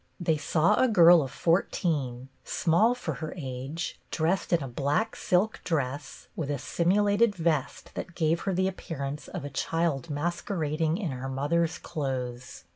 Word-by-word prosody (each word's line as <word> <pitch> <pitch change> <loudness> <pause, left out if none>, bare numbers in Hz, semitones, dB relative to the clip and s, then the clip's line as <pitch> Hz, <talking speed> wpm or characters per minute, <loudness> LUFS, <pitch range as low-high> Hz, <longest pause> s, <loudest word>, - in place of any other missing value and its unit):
They 165 -3 +2
saw 155 +5 +2
a 260 - +5
girl 175 -6 +7
of 135 - -3
fourteen, 145 -7 0
small 210 +9 +2
for 250 - -4
her 155 - -4
age, 140 +3 -5
dressed 170 +4 0
in 170 -4 +3
a - - -4
black 140 - 0
silk 190 +5 +1
dress 140 -3 -3
with 150 -4 -3
a 145 - 0
simulated 205 - +2
vest 160 -5 -1
that 175 - -6
gave 165 0 +2
her - - +1
the 185 +1 +2
appearance 150 -6 -5
of - - -6
a 145 - -6
child 160 -1 -1
masquerading 160 0 -1
in 190 -8 -2
her 130 +1 -5
mother's 160 +5 0
clothes. 130 -4 -4
160 Hz, 155 wpm, -28 LUFS, 140-175 Hz, -, girl